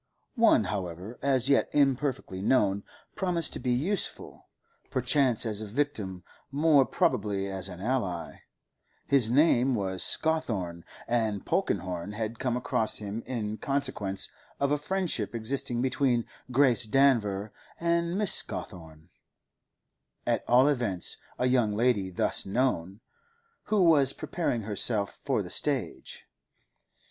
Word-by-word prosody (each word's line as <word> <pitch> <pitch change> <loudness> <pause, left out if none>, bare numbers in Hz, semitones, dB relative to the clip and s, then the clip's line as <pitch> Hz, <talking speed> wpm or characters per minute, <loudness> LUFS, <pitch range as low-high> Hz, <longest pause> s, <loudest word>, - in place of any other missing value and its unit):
One, 230 - +4
however, 95 +2 -5
as 135 -2 +2
yet 140 - +3
imperfectly 135 -8 0
known, 100 -3 +2 0.3
promised 175 -4 +2
to - - -4
be 125 - -3
useful, 165 +11 -1 0.4
perchance 130 -2 +2
as 110 -1 -1
a 110 - -6
victim, 105 - -3 0.3
more 145 -1 +4
probably 105 - 0
as 95 -1 -2
an 90 -1 -9
ally; 100 -8 -3 0.7
his 130 -5 +3
name 130 -1 +3
was 95 -3 -2
Scawthorne, 105 - +1 0.2
and 110 -4 -1
Polkenhorne 90 +2 -2
had 110 +1 -4
come 125 -2 -1
across 110 -3 0
him 105 +2 -5
in 110 -4 -3
consequence 105 -9 -2 0.3
of 140 0 +1
a 150 - +2
friendship 165 - -2
existing 120 +1 -1
between 130 -2 +1 0.2
Grace 125 -2 +3
Danver 110 -6 +2 0.3
and 170 +1 0
Mrs. 210 - +5
Scawthorne—at 80 -1 -9
all 125 +3 +5
events, 120 -11 0 0.2
a 125 - 0
young 125 -5 +2
lady 110 -4 +1
thus 90 - 0
known—who 205 - -3
was 150 -6 +5
preparing 125 -10 -3
herself 105 0 0
for - - 0
the - - -6
stage. - - -2
120 Hz, 120 wpm, -28 LUFS, 100-140 Hz, 0.7 s, Mrs